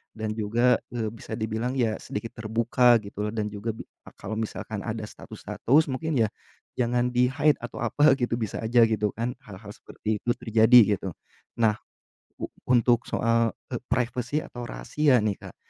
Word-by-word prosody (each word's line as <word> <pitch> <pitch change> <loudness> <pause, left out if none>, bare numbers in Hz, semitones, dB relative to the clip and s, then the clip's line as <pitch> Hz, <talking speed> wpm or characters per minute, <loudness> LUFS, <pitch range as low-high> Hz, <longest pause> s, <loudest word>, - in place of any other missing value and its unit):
Dan 110 -1 -3
juga, 115 +4 +3 0.2
eee, 110 -2 -1
bisa 115 - -9
dibilang 110 +3 -2
ya 115 -5 +1
sedikit 110 +2 -6
terbuka 115 +2 +3
gitu 100 0 -10
loh 105 - -3
dan 105 -1 -1
juga 105 +2 -4
bi - - -8 0.2
a - - -11
kalau 110 +2 -6
misalkan 110 -1 -4
ada 110 -1 -3
status-status 150 +6 0
mungkin 155 +5 -2
ya, 110 - 0 0.5
jangan 120 0 +1
di-hide 135 +5 +3
atau - - -7
apa 150 0 +4
gitu 120 -1 -1
bisa 110 -4 -3
aja 115 +2 +3
gitu 105 -1 +1
kan, 115 +3 -2
hal-hal 105 -5 -11
seperti 105 -1 -4
itu - - -4
terjadi 115 +1 +6 0.2
gitu. 95 - -5 0.5
Nah 110 -2 +3 0.6
u - - -6 0.2
untuk 120 -1 +3
soal, 115 -1 +1 0.2
e 120 - -2
privacy 125 +3 -1
atau 120 -1 -8
rahasia 125 - +1
nih, 105 -2 -1
Kak. - - -11
115 Hz, 170 wpm, -26 LUFS, 110-125 Hz, 0.6 s, terjadi